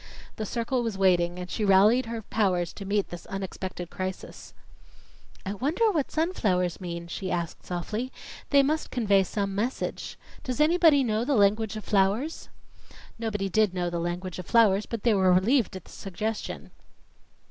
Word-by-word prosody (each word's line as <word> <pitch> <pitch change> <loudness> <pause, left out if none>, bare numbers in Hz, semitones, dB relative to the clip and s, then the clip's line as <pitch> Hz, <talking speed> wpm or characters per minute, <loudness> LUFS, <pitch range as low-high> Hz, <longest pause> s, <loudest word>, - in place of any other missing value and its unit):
The 215 - -3
circle 240 +3 -1
was 225 -4 -3
waiting, 175 -2 +3
and 180 0 -5
she 215 - -3
rallied 210 +5 +5
her 225 -1 -5
powers 185 -6 0
to 200 - -8
meet 200 0 0
this 175 0 -9
unexpected 190 -2 -5
crisis. 185 0 -6 0.9
"I 195 - -2
wonder 315 - +1
what 305 -8 -1
sunflowers 195 - 0
mean?" 170 -1 -5
she 185 +2 -5
asked 170 -2 -3
softly. 210 +8 -4 0.4
"They 280 -1 +5
must 305 +3 -1
convey 205 -6 +3
some 195 +1 -2
message. 225 +6 -3 0.3
Does 255 +1 -4
anybody 310 -2 +5
know 220 -2 0
the 280 +2 +1
language 210 +1 +2
of 215 - -6
flowers?" 210 +10 0 0.7
Nobody 210 -4 -2
did 205 -1 +2
know 175 -1 -1
the 170 - -2
language 175 +2 -4
of 180 - -7
flowers; 215 -3 +4
but 230 -3 -5
they 235 - +4
were 190 -2 +4
relieved 210 +4 +3
at 185 - -8
the - - -15
suggestion. 210 +3 -5
205 Hz, 165 wpm, -27 LUFS, 185-235 Hz, 0.9 s, rallied